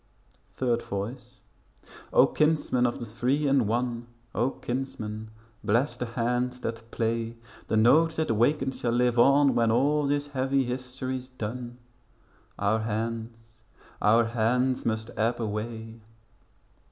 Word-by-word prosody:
Third 120 -2 +1
Voice 100 +6 -6 0.7
O, - - +7
kinsmen 150 -5 +2
of 120 - -3
the 120 - -5
Three 125 +7 0
in 135 -5 +3
One, 120 +1 -1 0.3
O, 120 +4 +1
kinsmen 110 -5 -5 0.3
bless 120 +8 +1
the 125 - -4
hands 125 +2 -1
that 115 -1 -5
play. 115 0 -1 0.3
The 110 - +1
notes 160 +9 +5
they 160 - +1
waken 135 +2 +1
shall 125 -2 -2
live 120 0 +2
on 140 +2 +5
When 115 -1 +2
all 140 +5 +2
this 145 +1 0
heavy 135 0 +1
history's 130 +1 -4
done. 120 0 -6 0.8
Our 100 +2 +1
hands, 115 +1 -4 0.4
our 115 +2 +5
hands 125 +3 +1
must 110 0 -2
ebb 115 +3 +1
away. 110 +1 -4
120 Hz, 130 wpm, -27 LUFS, 115-130 Hz, 0.8 s, O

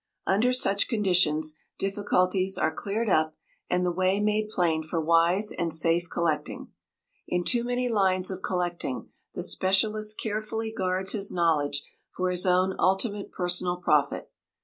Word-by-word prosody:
Under 215 +6 +2
such 200 -5 +2
conditions 180 -8 +2 0.2
difficulties 195 -1 +1
are - - +1
cleared 215 +3 -2
up, 155 -4 +2 0.3
and 180 0 +1
the 180 - +1
way 185 +2 +1
made 210 0 0
plain 170 -6 +1
for 160 +2 -3
wise 170 +6 +3
and 170 -1 -2
safe 165 +2 +1
collecting. 165 -3 -2 0.6
In 180 0 0
too 240 +5 +1
many 245 +1 -1
lines 190 -4 +1
of 190 0 -6
collecting 175 -7 -3 0.3
the - - -2
specialist 215 +3 +1
carefully 220 +1 -3
guards 185 +1 -1
his 200 -2 -3
knowledge 150 -5 +1 0.3
for 185 0 -2
his 180 +1 +1
own 185 +1 +3
ultimate 200 +2 0
personal 180 0 +1
profit. 150 -5 0
185 Hz, 145 wpm, -27 LUFS, 175-205 Hz, 0.6 s, wise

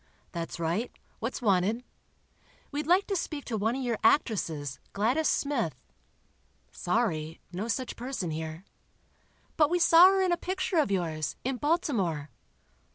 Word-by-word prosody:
"That's 170 -1 -5
right. 170 +9 -1 0.3
What's 245 +3 -4
wanted?" 205 +3 +2 0.9
"We'd 295 +1 -3
like 365 +3 +4
to 395 - -2
speak 305 -5 -3
to 235 - -3
one 220 +3 0
of 265 - -3
your 235 -3 -1
actresses, 160 - +1
Gladys 245 +10 +2
Smith." 265 - -1 0.9
"Sorry—no 175 -1 -2
such 255 +2 -2
person 240 -9 -4
here." 160 +3 -5 0.9
"But 300 -2 +5
we 355 - +2
saw 345 +1 +8
her 385 0 +3
in 370 - +1
a 345 - +2
picture 370 0 -2
of 300 - +2
yours, 165 -5 -1
in 265 0 -1
Baltimore." 220 - 0
230 Hz, 140 wpm, -29 LUFS, -, 0.9 s, saw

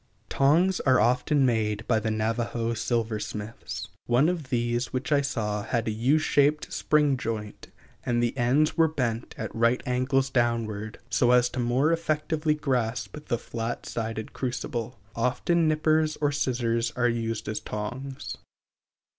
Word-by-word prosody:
Tongs 170 +7 +3
are 130 -2 +4
often 125 +5 +3
made 110 -3 0
by 115 -3 +3
the 110 - -2
Navajo 115 +1 -1
silversmiths. 110 -4 -3 0.2
One 125 +7 +4
of 165 -7 -3
these 120 0 0
which 130 +2 -3
I 145 -1 +4
saw 105 -7 -2
had 115 +2 -1
a - - +1
U 120 +8 +2
shaped 150 -1 +2
spring 150 -3 +2
joint, 110 -3 -5 0.4
and 120 - 0
the 120 +2 0
ends 135 +5 +2
were 165 -1 +5
bent 120 -7 -2
at - - -5
right 115 +2 +2
angles 135 +1 +1
downwards, 115 -4 -1
so 120 0 +3
as 125 0 +4
more 125 +5 +2
effectually 155 -1 0
to - - -14
grasp 125 -3 -1
the 120 - +1
flat 115 0 -5
sided 110 -1 -4
crucible. 125 -1 -3 0.2
Often 150 +8 +1
nippers 155 0 +2
or 145 -1 +2
scissors 120 -4 0
are 120 -1 +2
used 115 -2 -2
as 110 0 -2
tongs. 125 +6 -5
120 Hz, 145 wpm, -27 LUFS, 115-140 Hz, 0.4 s, were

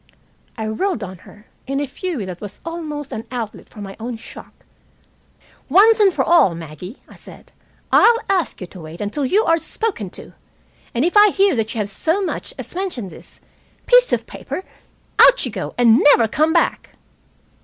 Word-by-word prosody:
I 220 -1 -3
whirled 225 - -2
on 185 -2 -8
her, 210 +1 -18 0.2
in 275 +1 -1
a 290 - -1
fury 285 - -5
that 180 -2 -8
was 205 -1 -7
only 310 -4 -5
an 220 - -6
outlet 235 -4 -6
for 210 - -12
my 195 -1 -8
own 235 +1 -5
shock. 225 - -13 1.0
"Once 430 +8 +5
for - - +1
all, 335 - +4
Maggie," 165 - -10
I - - -16
said, - - -13 0.4
"I'll 470 0 +6
ask 380 -4 0
you - - -4
to 180 0 -12
wait 160 +1 -10
until 235 +7 -2
you 415 +10 +3
are 330 0 +3
spoken 360 - -3
to. - - -12 0.6
And 245 +6 +2
if 350 - -1
I 415 0 +8
hear 390 -3 +2
that 225 0 -2
you - - -4
have 210 -2 -1
so 325 - 0
much 390 - -4
as - - -9
mentioned 345 - -4
this - - -14 0.5
piece - - +5
of - - 0
paper, 375 - -7 0.6
out - - +7
you - - -4
go - - -6
and 240 0 +5
never 240 -6 +5
come 310 +8 +1
back." 335 0 0
265 Hz, 185 wpm, -20 LUFS, -, 1.0 s, I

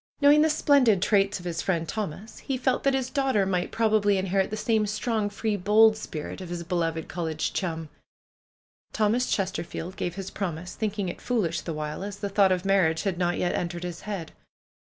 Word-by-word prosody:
Knowing 290 +1 +6
the 315 - +4
splendid 280 -9 +4
traits 200 +1 +2
of 180 - -11
his 170 -1 -2
friend 170 -3 -1
Thomas, 210 +1 -5
he 270 - -3
felt 255 0 +1
that 275 -1 +2
his 260 -1 -2
daughter 265 -8 +2
might 180 -2 -1
prob 225 -1 +1
ably 205 -2 +3
inherit 190 0 +1
the 215 - -4
same 220 -1 +1
strong, 215 0 -1
free, 210 +1 -2
bold 215 +3 +5
spirit 180 -4 -6
of 180 - -7
his 175 -1 -4
be 170 - -5
loved 165 -2 -1
college 160 -3 -3
chum. 165 -4 -3 1.1
Thomas 225 +3 +1
Chesterfield 185 -2 -3
gave 175 0 -3
his 195 -1 -6
promise, 180 -3 -4
thinking 210 -3 -2
it 175 - -6
foolish 210 -10 0
the 165 - -4
while, 150 +3 -4
as 200 0 -6
the 200 0 -3
thought 195 -1 +4
of 185 0 0
marriage 180 -5 +2
had 190 -3 -1
not 175 -1 +1
yet 175 - 0
entered 175 0 -3
his 175 -2 -5
head. 195 -6 -5
195 Hz, 200 wpm, -26 LUFS, 175-215 Hz, 1.1 s, Knowing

